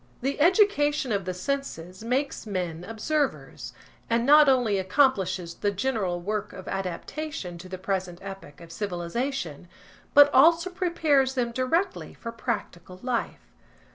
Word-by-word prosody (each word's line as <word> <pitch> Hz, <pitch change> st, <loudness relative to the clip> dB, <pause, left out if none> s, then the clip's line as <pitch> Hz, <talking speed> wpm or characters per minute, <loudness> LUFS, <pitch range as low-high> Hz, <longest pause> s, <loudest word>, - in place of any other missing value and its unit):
The 275 Hz, +4 st, -2 dB
education 300 Hz, -, +3 dB
of 200 Hz, -3 st, -1 dB
the 185 Hz, -, -2 dB
senses 185 Hz, -5 st, -4 dB
makes 255 Hz, +1 st, -2 dB
men 175 Hz, -4 st, -3 dB
observers, 275 Hz, +8 st, -2 dB, 0.4 s
and 230 Hz, +1 st, +2 dB
not 295 Hz, +1 st, +7 dB
only 240 Hz, -7 st, +2 dB
accomplishes 190 Hz, -5 st, +1 dB
the 205 Hz, -, -1 dB
general 200 Hz, -4 st, -1 dB
work 210 Hz, +3 st, -3 dB
of 185 Hz, -, -10 dB
adaptation 195 Hz, -, -5 dB
to 185 Hz, +1 st, -10 dB
the 185 Hz, -, -5 dB
present 185 Hz, -2 st, -3 dB
epoch 195 Hz, -6 st, -10 dB
of 165 Hz, -1 st, -12 dB
civilisation, 180 Hz, -, -3 dB, 0.5 s
but 290 Hz, 0 st, +8 dB
also 335 Hz, +6 st, +5 dB
prepares 310 Hz, -7 st, +1 dB
them 240 Hz, -2 st, 0 dB
directly 330 Hz, +11 st, -1 dB
for 230 Hz, -, -7 dB
practical 190 Hz, -6 st, -5 dB
life. 250 Hz, -2 st, -3 dB
225 Hz, 135 wpm, -26 LUFS, 185-280 Hz, 0.5 s, but